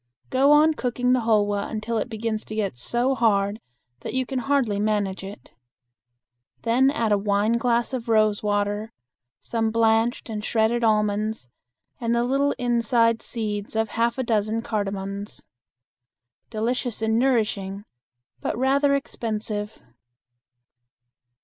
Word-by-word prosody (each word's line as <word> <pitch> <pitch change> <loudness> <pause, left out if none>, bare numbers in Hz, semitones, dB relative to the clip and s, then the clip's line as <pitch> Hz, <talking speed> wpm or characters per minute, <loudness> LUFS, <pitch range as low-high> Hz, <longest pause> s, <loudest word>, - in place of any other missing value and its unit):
Go 270 +2 +4
on 305 +2 +6
cooking 250 -2 0
the 255 - +3
hulwa 205 -3 +1
until 225 +1 -2
it 230 - -3
begins 220 -1 -3
to 215 - -7
get 200 - -1
so 240 - 0
hard 215 -3 +1 0.4
that - - -6
you 260 0 +1
can 260 +1 -3
hardly 245 -6 +1
manage 205 -3 -1
it. 195 -9 -10 1.1
Then 245 +4 +3
add 235 -6 0
a 205 - +3
wineglass 230 +5 +1
of 240 -2 -4
rose 215 -2 +3
water, 205 +1 -1 0.5
some 225 -1 -1
blanched 225 +1 +2
and 215 -2 -5
shredded 225 +2 +1
almonds 215 - 0 0.5
and 235 -1 0
the 235 - +2
little 275 +3 +1
inside 235 -1 +2
seeds 210 -3 -4
of 220 0 +1
half 235 +3 0
a 260 - 0
dozen 220 -1 0
cardamons. 200 -1 -4 1.0
Delicious 235 +1 -2
and 220 +1 +2
nourishing, 210 -6 0 0.5
but 135 - -3
rather 280 +2 +3
expensive. 215 -5 -4
225 Hz, 130 wpm, -24 LUFS, 210-240 Hz, 1.1 s, on